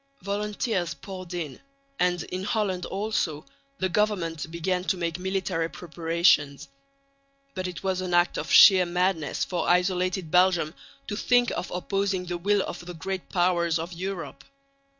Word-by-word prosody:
Volunteers 205 -2 -2
poured 185 -3 -9
in; 155 -6 -5 0.4
and 180 -2 +1
in 185 +1 -5
Holland 195 -4 -1
also 190 -7 -2 0.3
the 185 - 0
government 175 -6 -1
began 180 +2 -1
to 190 - 0
make 170 0 -2
military 185 -3 -1
preparations. 165 -4 +1 0.8
But 185 -1 -3
it 180 +1 -7
was 190 -1 0
an 185 -1 -4
act 175 0 +3
of - - -5
sheer 185 -3 +8
madness 180 -3 0
for 180 - -2
isolated 180 -1 +1
Belgium 180 -3 +3 0.3
to 205 - -4
think 245 +2 +3
of - - -4
opposing 195 +1 -1
the 175 -1 -4
will 200 +2 +2
of 175 - -6
the 175 0 -8
Great 185 +3 -5
Powers 175 -2 +2
of 165 +2 -5
Europe. 170 -6 -5
180 Hz, 150 wpm, -26 LUFS, 170-190 Hz, 0.8 s, sheer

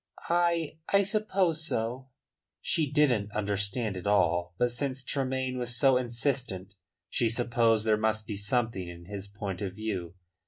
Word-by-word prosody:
"I 170 -2 +1
I 200 0 +5
suppose 190 -5 +1
so." 120 +1 -2 0.5
She 150 -4 +1
didn't 125 -9 +3
understand 105 +1 0
it 95 +2 -5
all. 85 -3 +2
But 120 0 +2
since 130 +2 -2
Tremayne 130 -1 -1
was 120 -1 0
so 135 +1 +5
insistent 120 -6 -1 0.3
she 115 - +1
supposed 115 -2 +2
there 110 -1 +4
must 110 0 0
be 105 - -4
something 100 -2 0
in 85 0 -10
his 100 +1 -6
point 100 -2 -5
of 95 -2 -3
view. 95 -6 -4
115 Hz, 150 wpm, -29 LUFS, 100-130 Hz, 0.5 s, I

